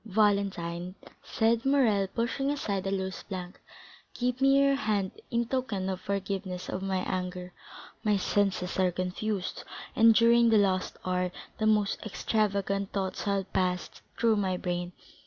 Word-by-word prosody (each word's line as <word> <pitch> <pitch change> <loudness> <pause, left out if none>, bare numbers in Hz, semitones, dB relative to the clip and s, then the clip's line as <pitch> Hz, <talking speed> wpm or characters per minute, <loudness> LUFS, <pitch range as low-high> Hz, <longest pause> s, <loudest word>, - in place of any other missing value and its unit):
"Valentine," 195 -4 0 0.3
said 225 +1 +1
Morrel 240 -8 +3
pushing 240 +7 -1
aside 200 -10 -2
a - - -1
loose 190 -1 -3
plank, 185 -1 -7 0.5
"give 250 +1 -1
me 275 0 +5
your 275 0 +4
hand 210 -7 0 0.2
in 235 0 0
token 230 -7 -2
of 185 -1 -3
forgiveness 195 -2 -3
of 185 - -3
my 190 -1 -1
anger; 180 -1 -4 0.5
my 210 -2 +3
senses 190 -1 0
are 185 -1 +4
confused, 185 +2 -3 0.3
and 225 -2 +6
during 235 0 +5
the 225 - +5
last 190 -2 +1
hour 180 0 0 0.3
the 215 - +2
most 210 -2 +2
extravagant 200 -2 -1
thoughts 190 0 -3
have 200 -1 -1
passed 180 -1 -1 0.2
through 230 -2 +3
my 190 -3 0
brain. 175 -1 -3
200 Hz, 145 wpm, -29 LUFS, 185-225 Hz, 0.5 s, and